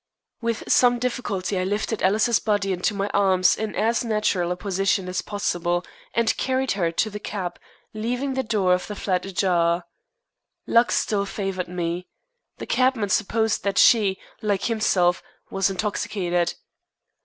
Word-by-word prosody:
With 230 Hz, -1 st, -2 dB
some 245 Hz, -1 st, +4 dB
difficulty 210 Hz, -6 st, -2 dB
I -, -, 0 dB
lifted 205 Hz, +3 st, -2 dB
Alice's 215 Hz, +4 st, +3 dB
body 205 Hz, -2 st, 0 dB
into 185 Hz, +3 st, -1 dB
my 200 Hz, 0 st, -1 dB
arms 190 Hz, -2 st, +4 dB
in 220 Hz, -1 st, -4 dB
as 230 Hz, +3 st, +1 dB
natural 210 Hz, -6 st, 0 dB
a -, -, 0 dB
position 195 Hz, -1 st, 0 dB
as 180 Hz, 0 st, -2 dB
possible, 175 Hz, -4 st, -1 dB, 0.3 s
and 230 Hz, -1 st, +2 dB
carried 260 Hz, 0 st, 0 dB
her 175 Hz, -4 st, 0 dB
to 215 Hz, +6 st, 0 dB
the 210 Hz, -, -6 dB
cab, 185 Hz, -4 st, -5 dB, 0.3 s
leaving 245 Hz, +5 st, -2 dB
the 265 Hz, -, 0 dB
door 210 Hz, -6 st, +1 dB
of 180 Hz, -, -1 dB
the 210 Hz, -, -5 dB
flat 185 Hz, -2 st, -1 dB
ajar. 175 Hz, -2 st, +1 dB, 0.8 s
Luck 235 Hz, +1 st, +3 dB
still 200 Hz, -2 st, 0 dB
favored 195 Hz, -3 st, -3 dB
me. 175 Hz, 0 st, -3 dB, 0.5 s
The -, -, -6 dB
cabman 255 Hz, -5 st, +1 dB
supposed 220 Hz, +2 st, +1 dB
that 200 Hz, -1 st, -1 dB
she, 205 Hz, -5 st, +5 dB, 0.2 s
like 205 Hz, -2 st, 0 dB
himself, 190 Hz, -6 st, +2 dB, 0.3 s
was 195 Hz, 0 st, +1 dB
intoxicated. 185 Hz, -3 st, -1 dB
200 Hz, 150 wpm, -24 LUFS, 185-220 Hz, 0.8 s, she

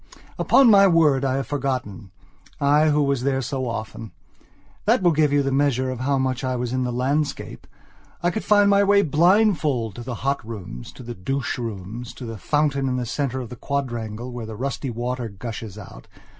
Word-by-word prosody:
Upon 270 Hz, -, +5 dB
my 200 Hz, -1 st, +7 dB
word 155 Hz, -6 st, +4 dB
I 130 Hz, -1 st, +1 dB
have 135 Hz, -, -1 dB
forgotten, 130 Hz, -9 st, -3 dB, 0.5 s
I 150 Hz, +2 st, +4 dB
who 150 Hz, 0 st, +3 dB
was 140 Hz, -3 st, 0 dB
there 135 Hz, 0 st, 0 dB
so 130 Hz, +1 st, -3 dB
often. 110 Hz, -1 st, -6 dB, 0.7 s
That -, -, +3 dB
will 175 Hz, -, +5 dB
give 150 Hz, -2 st, +2 dB
you 145 Hz, 0 st, +3 dB
the 135 Hz, -, -1 dB
measure 130 Hz, -2 st, +1 dB
of 130 Hz, -, -5 dB
how 135 Hz, +2 st, +1 dB
much 130 Hz, 0 st, -1 dB
I 130 Hz, -1 st, -1 dB
was 125 Hz, 0 st, -3 dB
in 130 Hz, 0 st, 0 dB
the 125 Hz, -, -2 dB
landscape. 140 Hz, +5 st, -2 dB, 0.6 s
I 175 Hz, -, +2 dB
could 215 Hz, -, -4 dB
find 205 Hz, -1 st, +4 dB
my 200 Hz, 0 st, +5 dB
way 200 Hz, 0 st, +4 dB
blindfolded 155 Hz, -, +2 dB
to -, -, -6 dB
the 120 Hz, 0 st, -5 dB
hot 140 Hz, -1 st, 0 dB
rooms, 95 Hz, -, -8 dB
to -, -, -11 dB
the 120 Hz, 0 st, -6 dB
douche 130 Hz, +7 st, -3 dB
rooms, 115 Hz, +1 st, -6 dB
to 125 Hz, -, -8 dB
the 115 Hz, -2 st, -7 dB
fountain 145 Hz, -1 st, +1 dB
in 125 Hz, -, -1 dB
the 125 Hz, -, -2 dB
centre 130 Hz, +1 st, -2 dB
of 120 Hz, -, -7 dB
the 125 Hz, -, -8 dB
quadrangle 120 Hz, -4 st, -4 dB
where 120 Hz, -2 st, -6 dB
the 110 Hz, -, -7 dB
rusty 135 Hz, +3 st, -3 dB
water 120 Hz, 0 st, -3 dB
gushes 110 Hz, 0 st, -7 dB
out. 105 Hz, -, -11 dB
130 Hz, 200 wpm, -23 LUFS, 120-145 Hz, 0.7 s, my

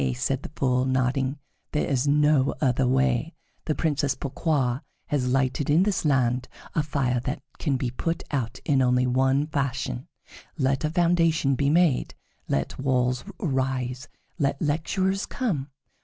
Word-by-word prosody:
said 135 Hz, -, -1 dB
the -, -, -7 dB
Fool, 125 Hz, -2 st, +2 dB
nodding; 130 Hz, +1 st, 0 dB, 0.4 s
"there 150 Hz, -, +1 dB
is 135 Hz, 0 st, 0 dB
no 150 Hz, -1 st, +3 dB
other 130 Hz, -2 st, +2 dB
way. 130 Hz, +4 st, +1 dB, 0.3 s
The 155 Hz, -, 0 dB
Princess 145 Hz, -4 st, 0 dB
Pourquoi 135 Hz, -2 st, 0 dB, 0.3 s
has 135 Hz, -4 st, 0 dB
lighted 135 Hz, +2 st, +1 dB
in 160 Hz, +5 st, +5 dB
this 200 Hz, -4 st, 0 dB
land 130 Hz, -3 st, +2 dB, 0.3 s
a 155 Hz, -, +2 dB
fire 135 Hz, -4 st, 0 dB
that 125 Hz, +3 st, -4 dB, 0.2 s
can 140 Hz, -4 st, 0 dB
be 125 Hz, -2 st, -2 dB
put 165 Hz, +6 st, -2 dB
out 125 Hz, -6 st, -2 dB
in 135 Hz, -2 st, +3 dB
only 125 Hz, 0 st, +3 dB
one 130 Hz, +3 st, +2 dB
fashion. 135 Hz, -, -2 dB, 0.5 s
Let 135 Hz, +2 st, +1 dB
a 155 Hz, -, +1 dB
foundation 165 Hz, -4 st, +2 dB
be 140 Hz, +1 st, +1 dB
made; 165 Hz, -3 st, +2 dB, 0.3 s
let 70 Hz, -, -2 dB
walls 125 Hz, -2 st, +1 dB, 0.2 s
arise; 130 Hz, -3 st, -1 dB, 0.3 s
let 140 Hz, -1 st, +1 dB
lecturers 185 Hz, +6 st, 0 dB
come. 175 Hz, -, -2 dB
135 Hz, 145 wpm, -26 LUFS, 130-150 Hz, 0.5 s, in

